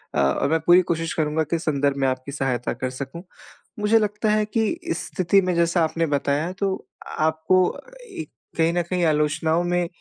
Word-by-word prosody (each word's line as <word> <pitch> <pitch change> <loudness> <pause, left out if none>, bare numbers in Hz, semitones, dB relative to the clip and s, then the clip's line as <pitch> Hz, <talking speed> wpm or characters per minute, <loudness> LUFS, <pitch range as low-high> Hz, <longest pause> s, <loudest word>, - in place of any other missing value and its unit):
अ, - - +2
और 70 - +2
मैं 160 0 +2
पूरी 175 +1 +7
कोशिश 165 0 -2
करूँगा 155 0 0
कि 170 - -2
इस 165 - -3
संदर्भ 140 -2 +1
में 135 -1 +1
आपकी 130 +2 -3
सहायता 130 -4 -1
कर 130 - -3
सकूँ। 135 +6 -7 0.6
मुझे 215 +2 +4
लगता 210 +1 -1
है 215 0 +2
कि 220 0 0 0.2
इस - - -3
स्थिति 190 +1 +2
में 180 -1 0
जैसा 170 0 +2
आपने 165 +1 0
बताया 145 +3 0
तो, 195 -1 -2 0.3
आपको 160 +4 +2 0.6
एक - - -6 0.3
कहीं 165 +1 +3
न 175 - +1
कहीं 180 -1 0
आलोचनाओं 155 +2 +1
में 175 0 0
165 Hz, 190 wpm, -23 LUFS, 145-180 Hz, 0.6 s, पूरी